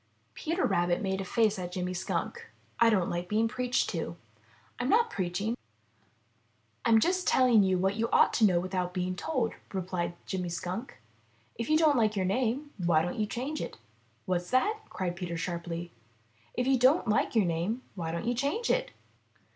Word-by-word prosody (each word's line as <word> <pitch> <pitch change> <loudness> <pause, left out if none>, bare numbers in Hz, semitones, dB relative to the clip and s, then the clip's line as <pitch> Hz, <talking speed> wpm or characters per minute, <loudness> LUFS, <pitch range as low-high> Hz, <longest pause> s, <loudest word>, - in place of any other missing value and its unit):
'* - - -41
Peter 335 +3 -1
Rabbit 175 0 +1
made 190 -1 -1
a - - -2
face 215 +1 +1
at 180 -1 -5
Jimmy 180 0 -2
Skunk. 460 - -3 0.3
''I 235 - +6
don't 190 -6 +2
like 175 +1 -3
being 220 +2 +2
preached 250 +2 0
to." - - -4 0.6
'I'm - - -1
not 465 +1 +4
preaching; 195 +5 -1 1.3
I'm 225 -1 +5
just 360 +7 +1
telling 250 -4 +5
you 190 -1 +2
what 190 +3 0
you 230 +1 0
ought - - +5
to 230 - +1
know 180 -4 +4
without 180 0 -2
being 180 0 -1
told," 245 - -1 0.2
replied 180 -2 -2
Jimmy 180 -2 -3
Skunk. 180 - -5 0.6
''If 230 - -3
you 310 - +5
don't 310 -4 +4
like 215 -2 +2
your 190 -2 0
name, 250 +8 0
why 165 -2 +4
don't 175 +5 -3
you 210 - +1
change 265 +8 -3
it?" - - -6 0.5
"What's 180 -1 -1
that?" 420 +13 +2
cried 180 -3 -3
Peter 175 -1 -4
sharply. 170 0 -4 0.6
"If 250 - 0
you 265 -1 +3
don't 260 +3 +4
like 215 +2 +1
your 215 -4 +4
name, 175 +9 -1
why 165 -4 -4
don't 170 +6 -3
you 240 - +1
change 285 - 0
it?" - - +1
205 Hz, 185 wpm, -30 LUFS, 180-250 Hz, 1.3 s, I